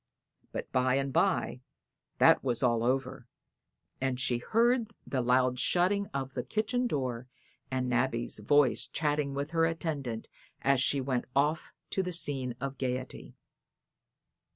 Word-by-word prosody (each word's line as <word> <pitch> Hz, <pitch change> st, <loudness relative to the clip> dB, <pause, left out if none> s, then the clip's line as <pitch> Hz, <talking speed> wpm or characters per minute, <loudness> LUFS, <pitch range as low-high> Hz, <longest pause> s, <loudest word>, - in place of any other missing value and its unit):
But -, -, -5 dB
by 130 Hz, 0 st, +2 dB
and 135 Hz, -1 st, -1 dB
by 185 Hz, -9 st, +1 dB, 0.6 s
that -, -, +5 dB
was 120 Hz, -2 st, 0 dB
all 120 Hz, -2 st, +2 dB
over, 130 Hz, -1 st, -1 dB, 0.7 s
and 130 Hz, -1 st, -1 dB
she 120 Hz, -1 st, 0 dB
heard 235 Hz, -, +1 dB
the 130 Hz, -, -1 dB
loud 125 Hz, +1 st, +2 dB
shutting 195 Hz, +6 st, +2 dB
of 135 Hz, -3 st, -4 dB
the 125 Hz, -, -2 dB
kitchen 225 Hz, -, -1 dB
door 130 Hz, -, -2 dB, 0.4 s
and 130 Hz, -1 st, -1 dB
Nabby's 125 Hz, -2 st, 0 dB
voice 140 Hz, +4 st, +3 dB
chatting 145 Hz, -2 st, -1 dB
with 140 Hz, +3 st, -3 dB
her 165 Hz, -1 st, +3 dB
attendant 145 Hz, -9 st, -3 dB, 0.4 s
as 135 Hz, -2 st, +3 dB
she 140 Hz, +1 st, +2 dB
went 130 Hz, -2 st, -1 dB
off 150 Hz, +3 st, +1 dB, 0.2 s
to 190 Hz, -, +1 dB
the 180 Hz, -1 st, -4 dB
scene 135 Hz, -7 st, +1 dB
of 135 Hz, +1 st, -5 dB
gaiety. 130 Hz, -1 st, -4 dB
135 Hz, 140 wpm, -30 LUFS, 125-160 Hz, 0.7 s, that